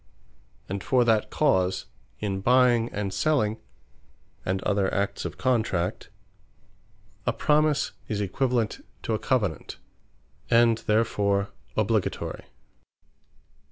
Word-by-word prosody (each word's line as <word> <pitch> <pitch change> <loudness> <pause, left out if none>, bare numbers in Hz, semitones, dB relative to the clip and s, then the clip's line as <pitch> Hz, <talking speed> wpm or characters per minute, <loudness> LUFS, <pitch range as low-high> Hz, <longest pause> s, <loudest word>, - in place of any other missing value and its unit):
And 95 0 -4
for 125 -2 +3
that 110 -2 +2
cause, 95 -10 +1 0.3
in 100 -2 -2
buying, 120 0 +4
and 100 -2 -3
selling, 120 -9 +1 0.9
and 95 +1 -1
other 100 -2 +1
acts 100 0 -1
of - - -5
Contract, 110 -7 0 1.2
A - - +4
Promise 150 -1 +2 0.2
is 105 - -2
equivalent 115 +3 -1 0.2
to 115 - -1
a 110 - 0
Covenant; 105 - -1 0.7
and 115 -1 +4
therefore 100 -2 +1 0.3
obligatory. 110 -1 -1
110 Hz, 100 wpm, -26 LUFS, 100-120 Hz, 1.2 s, buying